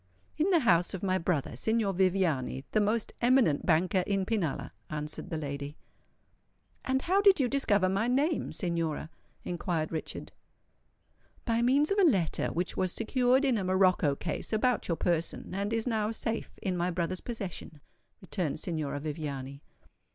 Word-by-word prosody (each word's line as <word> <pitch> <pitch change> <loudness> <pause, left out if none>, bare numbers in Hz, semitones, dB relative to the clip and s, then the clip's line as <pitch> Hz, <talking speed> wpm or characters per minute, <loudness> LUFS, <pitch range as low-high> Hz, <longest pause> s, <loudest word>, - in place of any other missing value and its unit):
"In 320 +5 +1
the 345 -4 +4
house 175 -6 +3
of 190 - -7
my 185 -1 +1
brother, 165 -8 -1
Signor 220 - +1
Viviani, 175 -8 +1
the 215 - +3
most 215 +2 0
eminent 240 - +3
banker 180 +3 +3
in 195 -2 0
Pinalla," 195 -9 -2 0.2
answered 150 0 -5
the 160 - -2
lady. 145 0 -5 1.1
"And 265 0 0
how 385 +3 +3
did 395 -4 +6
you 260 - +3
discover 210 -8 +2
my 195 +5 +1
name, 285 +6 +1
Signora?" 165 -3 -2 0.3
inquired 170 -2 -2
Richard. 160 -2 -5 1.1
"By 230 -1 +1
means 275 +7 +3
of 400 - +2
a - - +5
letter 180 - 0
which 175 +1 -2
was 185 -1 0
secured 250 +4 +2
in 250 -5 +2
a - - -2
morocco 185 -5 +3
case 160 +2 -5
about 230 +1 +1
your 170 - 0
person, 170 0 -2
and 200 +2 -2
is 225 -1 0
now 220 -3 0
safe 225 0 -4
in 185 -3 0
my 175 0 0
brother's 180 +1 -2
possession," 195 -9 -6 0.4
returned 180 -5 -3
Signora 155 -5 -3
Viviani. 140 -3 -5
185 Hz, 160 wpm, -30 LUFS, 165-230 Hz, 1.1 s, did